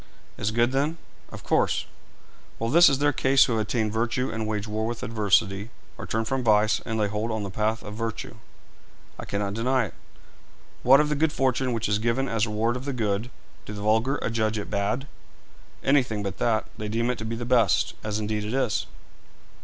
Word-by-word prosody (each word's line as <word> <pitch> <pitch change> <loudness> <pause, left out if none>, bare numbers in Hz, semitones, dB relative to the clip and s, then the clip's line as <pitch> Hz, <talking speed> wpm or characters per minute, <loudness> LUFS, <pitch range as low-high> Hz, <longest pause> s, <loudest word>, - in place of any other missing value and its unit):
'Is 105 - -1
good, 120 +2 +2
then?' 145 +5 0 0.3
'Of - - -9
course.' - - +1 0.7
'Well, 115 +1 -2
this 170 +4 +8
is 135 - +1
their 145 +1 +2
case 135 +1 +4
who 125 - -1
have 110 - +1
attained 110 0 -1
virtue 120 +3 0
and 110 -1 -3
wage 105 -1 -2
war 110 +1 -2
with 115 -1 -4
adversity, 100 -1 +1 0.3
or 110 -4 -8
turn 110 +4 -1
from 135 +2 -1
vice 110 -1 +3
and 110 -1 -2
lay 105 -2 +1
hold 105 +3 -2
on 110 -2 -2
the 100 - -5
path 110 +3 -1
of 105 - -7
virtue.' 115 0 -5 0.8
'I - - -6
cannot 100 0 -2
deny 125 +3 +1
it.' 95 - -9 0.9
'What 135 +3 +7
of 150 - 0
the 150 - +1
good 155 +2 +2
fortune 130 -3 0
which 115 -1 -1
is 105 +1 +1
given 120 +4 0
as 115 -2 0
reward 110 +3 0
of 130 - -8
the 140 - -2
good 110 -1 -1 0.4
do 105 - -6
the 100 0 -6
vulgar 110 +6 +2
adjudge 110 -1 0
it 105 - -5
bad?' 105 +6 -1 0.8
'Anything 125 -7 +2
but 100 -1 -5
that; 110 -2 +1
they 105 - -4
deem 115 +3 0
it 125 - -5
to 110 - -4
be 115 +1 -3
the 120 +1 -4
best, 120 -5 +3
as 105 -1 -2
indeed 105 0 -2
it 110 +4 -3
is.' 130 -6 0
115 Hz, 210 wpm, -26 LUFS, 105-125 Hz, 0.9 s, this